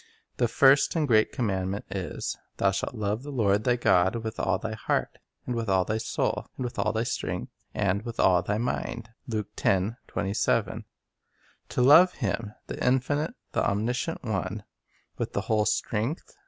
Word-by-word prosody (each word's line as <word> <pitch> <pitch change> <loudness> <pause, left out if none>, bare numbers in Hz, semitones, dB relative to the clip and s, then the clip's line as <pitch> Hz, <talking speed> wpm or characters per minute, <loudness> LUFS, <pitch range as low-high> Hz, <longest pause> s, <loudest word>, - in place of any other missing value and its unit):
The 120 - +3
first 135 +6 +5
and 155 -3 +1
great 110 -3 +4
commandment 100 -3 -2
is, 95 -2 -3
" - - -46
Thou 95 - +3
shalt 95 +5 -3
love 105 +1 -1
the 145 - -8
Lord 105 -5 +2
thy 125 -1 +4
God 95 -4 +3
with 115 -1 -4
all - - +1
thy 110 -1 -4
heart, 110 - -2 0.3
and 125 - -2
with 115 -3 -2
all 95 -1 +3
thy 110 +3 -1
soul, 110 - -1
and - - -3
with 120 - -5
all 105 - +2
thy 110 +1 0
strength, 120 - -3 0.2
and 100 -1 +1
with 115 0 -7
all 90 -2 +5
thy 105 +3 -1
mind." 115 -1 -3 0.2
1 110 -3 -2 0.7
To 100 +4 -3
love 165 +7 +8
Him, 105 -2 -3
the - - -5
infinite, 135 +4 +1 0.2
the - - 0
omniscient 120 +10 -1
One, 105 -2 -2 0.6
with - - -3
the 100 - 0
whole 110 0 +1
strength 110 +6 -2
110 Hz, 170 wpm, -27 LUFS, 100-125 Hz, 0.7 s, love